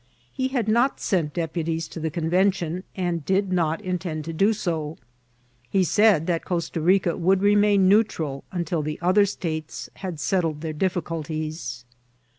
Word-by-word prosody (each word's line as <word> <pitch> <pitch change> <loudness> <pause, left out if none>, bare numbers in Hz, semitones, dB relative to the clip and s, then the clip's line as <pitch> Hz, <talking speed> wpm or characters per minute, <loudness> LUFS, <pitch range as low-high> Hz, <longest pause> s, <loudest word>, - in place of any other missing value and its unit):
He 260 - -1
had 250 -5 -1
not 240 +5 +2
sent 165 -6 -1
deputies 165 -1 -2
to - - -7
the 160 0 -1
Convention, 175 +2 0
and 175 -4 -2
did 190 +2 +1
not 165 -3 +1
intend 180 -5 -3
to 165 - -5
do 195 +7 +3
so; 165 -7 -3 0.7
but 190 -2 +3
said 205 -4 +4
that 170 -2 0
Costa 170 -2 -2
Rica 180 0 +3
would 190 +2 +2
remain 205 -1 +4
neutral 185 -9 +2
until 170 -2 -1
the 150 0 -3
other 185 +4 +4
states 160 -5 -5
had 180 -5 -5
settled 160 -1 0
their 160 -1 -3
difficulties. 155 -6 -3
175 Hz, 150 wpm, -24 LUFS, 160-195 Hz, 0.7 s, said